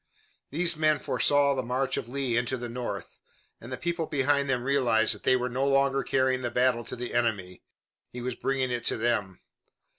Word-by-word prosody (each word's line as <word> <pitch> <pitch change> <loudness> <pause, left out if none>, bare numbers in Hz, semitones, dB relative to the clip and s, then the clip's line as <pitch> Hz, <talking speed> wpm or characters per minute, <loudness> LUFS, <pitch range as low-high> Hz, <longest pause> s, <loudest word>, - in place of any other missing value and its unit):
These 170 +3 +2
men 155 -1 +2
foresaw 145 +1 +2
the 130 - -1
march 130 +2 -1
of 115 - -4
Lee 130 -2 -1
into 120 +2 0
the 120 0 -5
North, 120 +1 -6 0.4
and 120 - -11
the 130 - -3
people 170 -2 -2
behind 140 0 +1
them 125 -2 0
realized 120 -5 +3
that 105 - -9
they 130 - +3
were 125 0 -1
no 130 +3 -1
longer 135 0 +2
carrying 130 -1 +1
the 120 - -2
battle 125 0 +1
to - - -6
the 125 0 -6
enemy. 100 -7 -1 0.5
He 125 - -7
was 125 +1 -3
bringing 130 0 -1
it 120 -1 -2
to - - +1
them. 110 -5 -1
130 Hz, 200 wpm, -27 LUFS, 120-140 Hz, 0.5 s, realized